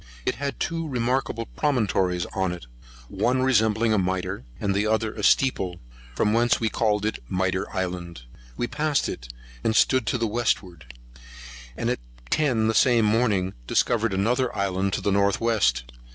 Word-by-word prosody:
It - - +1
had 140 0 -4
two 165 -1 -2
remarkable 125 -3 -1
promontories 95 - 0
on 95 -2 0
it, 85 -5 -9 0.4
one 130 - 0
resembling 110 -3 +3
a 105 - +3
mitre, 95 -3 -2
and 100 -1 0
the 105 +2 +1
other 110 0 0
a 105 - -6
steeple; 95 -6 +2 0.4
from 105 - +2
whence 120 +1 +3
we 110 - 0
called 105 -2 0
it 110 - -2
Mitre 95 0 -1
Island. 90 - -4 0.3
We - - 0
passed 150 +3 0
it, - - -6 0.3
and 110 - +1
stood 130 -3 +3
to - - +1
the 115 - 0
westward; 90 - -2 0.8
and - - -2
at - - 0 0.3
ten, 125 -8 +2
the 110 - +2
same 120 -1 +4
morning, 105 -4 +1
discovered 115 -2 +1
another 120 +6 +1
island 95 0 0
to - - -1
the 100 - 0
north 100 0 +2
west. 110 - +2
110 Hz, 165 wpm, -25 LUFS, 95-120 Hz, 0.8 s, same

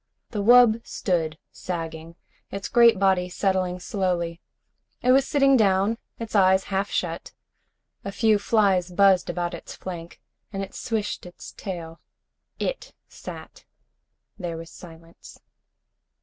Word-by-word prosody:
The 210 - -2
wub 230 0 +6
stood 160 -5 -2
sagging, 165 -1 -6 0.3
its 195 0 -5
great 235 -4 +6
body 190 -2 +2
settling 185 -1 0
slowly. 175 -3 -2 0.6
It 250 - +4
was 270 +1 +4
sitting 275 -1 +4
down, 205 0 +2 0.2
its 230 -1 -7
eyes 190 -1 +5
half 195 +1 0
shut. 170 -1 -3 0.7
A 200 - -4
few 215 0 +3
flies 200 -4 +2
buzzed 190 0 +4
about 175 0 -2
its - - -8
flank, 170 -2 -8 0.3
and 195 -1 -3
it 195 - -9
switched 215 -5 -3
its 175 - -11
tail. 170 -4 -7 0.6
It - - -4
sat. - - -10 0.8
There 170 -3 -4
was 165 0 -9
silence. 165 -1 -14
190 Hz, 125 wpm, -25 LUFS, 175-215 Hz, 0.8 s, wub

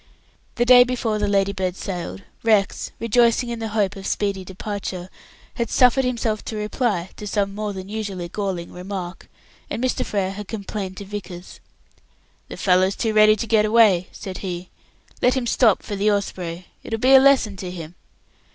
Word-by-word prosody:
The 240 - +1
day 245 0 +9
before 240 -4 -1
the 210 - 0
Ladybird 195 -2 0
sailed, 190 0 -5 0.2
Rex 215 -3 +2
rejoicing 235 +1 +3
in 235 -1 -4
the 225 - -3
hope 210 -2 0
of 195 -1 -6
speedy 200 -2 -1
departure 190 -1 -6 0.5
had 235 - -1
suffered 250 +1 +4
himself 230 -4 -1
to 220 - -5
reply 210 -4 -1
to 210 - -7
some 200 -1 -1
more 210 0 -3
than 190 -1 -7
usually 200 -4 -4
galling 185 -2 -4
remark 180 -1 -7 0.4
and - - -3
Mr. 255 - 0
Frere 195 -2 -1
had 205 0 -7
complained 200 -3 -5
to 200 - -7
Vickers. 190 -3 -8 0.9
"The - - -8
fellow's 185 +1 +3
too 225 -2 -1
ready 215 0 +6
to 215 - -3
get 220 -1 +3
away," 210 -5 +4
said 190 -2 -7
he. 180 -2 -6 0.5
"Let 250 +1 +3
him 260 -2 -1
stop 230 -3 +3
for 205 - -5
the 205 +2 +2
Osprey, 180 -3 -3 0.2
it - - -10
will 225 - 0
be 255 +4 +4
a 265 - +10
lesson 265 -6 +4
to 185 -1 -5
him." 170 -2 -8
205 Hz, 180 wpm, -22 LUFS, 190-225 Hz, 0.9 s, a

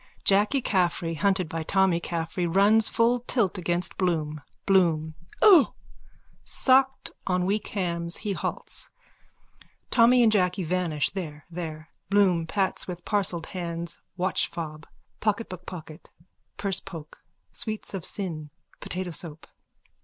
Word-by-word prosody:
(Jacky 210 +7 +3
Caffrey, 175 -3 +1
hunted 185 +1 +1
by 165 +1 -4
Tommy 190 +1 +2
Caffrey, 170 +1 -2
runs 205 +5 +4
full 235 +2 +2
tilt 230 -6 0
against 175 0 -2
Bloom.) 155 -5 -1 0.2
BLOOM: 165 -5 +3 0.3
O. 360 -9 +7 0.7
_(Shocked, 265 0 +3 0.2
on 180 -1 +1
weak 205 +3 -1
hams, 170 -3 -2
he 205 -2 -3
halts. - - -4 1.0
Tommy 245 +1 +6
and 225 - +5
Jacky 185 -2 +2
vanish 165 -4 0
there, 155 -6 -6
there. 160 -2 -6 0.2
Bloom 185 -5 +3
pats 195 +1 0
with 175 -1 -7
parcelled 185 -5 +1
hands 170 -2 -4 0.2
watch, 185 +1 0
fobpocket, 170 +7 -5
bookpocket, 175 -3 -9 0.5
pursepoke, 190 -5 -3 0.3
sweets 220 -3 -4
of 190 -4 -4
sin, 160 -7 -3 0.3
potato 180 -1 -3
soap.) 160 -1 -2
180 Hz, 115 wpm, -26 LUFS, 165-200 Hz, 1.0 s, O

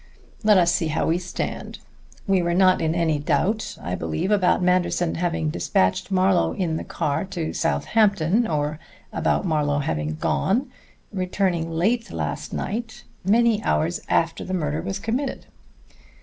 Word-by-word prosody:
Let 210 -2 +6
us 170 -1 +4
see 165 - 0
how 155 +1 0
we 165 +2 +1
stand. 180 0 -5 0.5
We 195 -3 +2
were 170 0 0
not 185 0 +4
in 160 0 0
any 160 -3 +1
doubt, 175 +9 0
I 90 - -5
believe, 80 - -2
about 185 -3 +3
Manderson 180 -1 +1
having 165 -3 -1
despatched 115 - 0
Marlowe 185 -1 +2
in 170 -5 -1
the - - -4
car 145 -2 -2
to 175 -4 -4
Southampton, 200 +3 +2
or 150 0 -1 0.3
about - - 0
Marlowe 150 -4 +1
having 75 - -2
gone, 240 - 0 0.4
returning 185 -3 -1
late 220 +9 0
last - - -4
night, 225 +1 -4 0.2
many 220 +2 +3
hours 170 +3 0
after 165 0 +1
the 185 - -3
murder 155 -2 -1
was 190 +2 -3
committed." 245 +7 -3
175 Hz, 150 wpm, -23 LUFS, 155-195 Hz, 0.5 s, Let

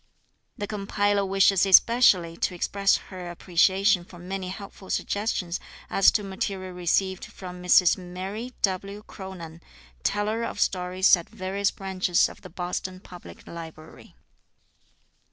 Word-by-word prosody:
The 205 - -3
compiler 205 0 0
wishes 195 -1 +3
especially 195 -4 +5
to 180 - -1
express 195 +3 +2 0.2
her 180 -1 -6
appreciation 190 +2 +2
for 175 0 -14
many 185 +2 -5
helpful 195 0 -10
suggestions 200 -4 -2 0.3
as 195 - +6
to 210 - 0
material 190 -1 -4
received 180 +1 0
from 180 -1 -10
Mrs 180 0 +5
Mary 190 +7 -6
W. 195 +2 -1
Cronan, 170 -4 -9 0.4
teller 210 - 0
of 205 - -4
stories 185 0 +3
at 170 -2 -9
various 200 -1 -1
branches 190 -2 +1
of - - -14
the - - -11
Boston 180 +1 -4
Public 180 -2 -13
Library. 160 -1 -11
190 Hz, 125 wpm, -26 LUFS, 180-200 Hz, 0.4 s, as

